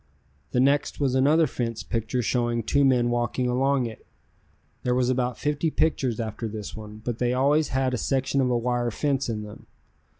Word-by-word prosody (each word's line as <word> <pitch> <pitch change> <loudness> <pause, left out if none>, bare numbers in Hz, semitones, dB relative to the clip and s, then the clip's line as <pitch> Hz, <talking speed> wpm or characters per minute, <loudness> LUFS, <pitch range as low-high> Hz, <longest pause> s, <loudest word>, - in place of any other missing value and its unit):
The 125 - 0
next 140 +2 +2
was 135 -3 +1
another 145 +5 +4
fence 115 -4 -3
picture 115 +1 -2
showing 120 0 0
two 140 +6 +2
men 125 -3 +3
walking 120 +1 0
along 130 +1 +1
it. 110 -2 -9 0.7
There 125 0 0
was 125 0 +2
about 125 -1 -1
fifty 150 +2 0
pictures 135 -7 0
after 110 0 -3
this 105 -1 -6
one, 105 0 -10
but 120 -2 -3
they 125 0 +1
always 145 +4 +3
had 130 0 0
a 125 - -1
section 135 0 0
of 130 - +1
a 120 - +2
wire 120 0 0
fence 135 +2 -1
in 105 -2 -3
them. 105 0 -11
125 Hz, 190 wpm, -25 LUFS, 120-135 Hz, 0.7 s, another